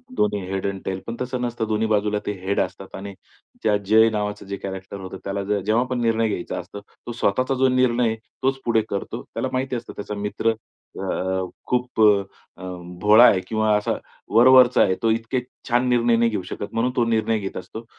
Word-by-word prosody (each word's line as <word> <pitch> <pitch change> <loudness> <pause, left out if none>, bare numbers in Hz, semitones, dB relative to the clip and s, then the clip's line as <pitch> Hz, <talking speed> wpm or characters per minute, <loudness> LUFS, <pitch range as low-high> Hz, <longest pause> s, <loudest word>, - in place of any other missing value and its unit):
दोन्ही 105 0 +1
head 95 0 -2
and 95 -1 -4
tail. 95 0 -2
पण 115 - -4
तसं 125 0 -3
नसतं. 120 -2 -2
दोन्ही 110 +1 0
बाजूला 105 -1 +1
ते - - -1
हेड 95 +2 -1
असतात - - -4
आणि 100 +1 -7 0.5
त्यात 105 -2 +3
जय 110 +2 +6
नावाचं 105 -1 -3
जे 100 0 -5
कॅरेक्टर 95 +1 -7
होतं, 95 -1 -7
त्याला 100 0 -3 0.2
जेव्हा 110 +5 +1
आपण 125 -1 -3
निर्णय 115 -1 +2
घ्यायचा 100 -4 -3
असतो. 90 +3 -8
तो 120 - -12
स्वतःचा 130 +3 0
जो 130 +1 +3
निर्णय, 125 -3 +2 0.3
तोच 135 0 +1
पुढे 115 -2 +3
करतो. 100 - -4
त्याला - - -2
माहिती 130 0 -1
असतं, 120 0 -6
त्याचा 105 +1 -5
मित्र 105 +2 0 1.1
खूप 125 -2 -1
अ, 105 -2 +6 0.4
अं, 90 -1 -8
भोळा 105 +3 +7
आहे 100 - +5
किंवा 110 -1 +1
असा 105 - 0 0.4
वरवरचा 125 +1 +7
आहे. 95 -1 +2
तो 115 - +3
इतके 115 +3 -1 0.3
छान 125 +1 +2
निर्णय 120 -1 +3
नाही 115 0 +3
घेऊ 105 -4 -2
शकत, 100 - -6
म्हणून, 120 +3 +1
तो 120 - +2
निर्णय 110 -1 +1
घेत 95 -2 -5
असतो. 110 +5 -8
110 Hz, 195 wpm, -23 LUFS, 100-120 Hz, 1.1 s, भोळा